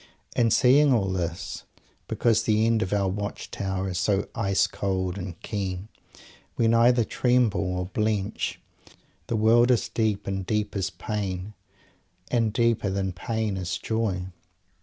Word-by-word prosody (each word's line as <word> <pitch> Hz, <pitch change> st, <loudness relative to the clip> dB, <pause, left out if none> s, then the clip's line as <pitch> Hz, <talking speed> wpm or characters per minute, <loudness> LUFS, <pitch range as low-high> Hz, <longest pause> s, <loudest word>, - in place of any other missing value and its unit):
_ -, -, -23 dB, 0.3 s
And 115 Hz, -2 st, +3 dB
seeing 135 Hz, +5 st, +5 dB
all 100 Hz, -6 st, +2 dB
this, 85 Hz, -2 st, -4 dB, 0.4 s
because 115 Hz, -2 st, +2 dB
the 110 Hz, 0 st, +2 dB
air 115 Hz, -, +3 dB
of 95 Hz, -, -2 dB
our 100 Hz, -1 st, +1 dB
watch 100 Hz, +2 st, -4 dB
tower 95 Hz, -1 st, -2 dB
is 90 Hz, -2 st, -2 dB
so 100 Hz, +3 st, +1 dB
ice 100 Hz, -4 st, +2 dB
cold 95 Hz, -2 st, -2 dB
and 90 Hz, -3 st, -6 dB
keen, 100 Hz, -2 st, -4 dB, 0.7 s
we 115 Hz, -, +3 dB
neither 115 Hz, +1 st, +5 dB
tremble 105 Hz, -7 st, +1 dB
or 90 Hz, -, -2 dB
blench. 105 Hz, +1 st, -1 dB, 0.7 s
The 115 Hz, -, -1 dB
world 115 Hz, +3 st, +4 dB
is 125 Hz, -3 st, +2 dB
deep, 110 Hz, -3 st, 0 dB
and 95 Hz, -1 st, -2 dB
deep 105 Hz, +2 st, -1 dB
is 95 Hz, -4 st, -1 dB
pain, 100 Hz, -1 st, -4 dB, 0.8 s
and 115 Hz, -3 st, +2 dB
deeper 115 Hz, -2 st, +1 dB
than 95 Hz, -1 st, -2 dB
pain 110 Hz, +2 st, -2 dB
is 90 Hz, -2 st, -2 dB
joy. 110 Hz, -5 st, -1 dB
105 Hz, 150 wpm, -26 LUFS, 95-115 Hz, 0.8 s, seeing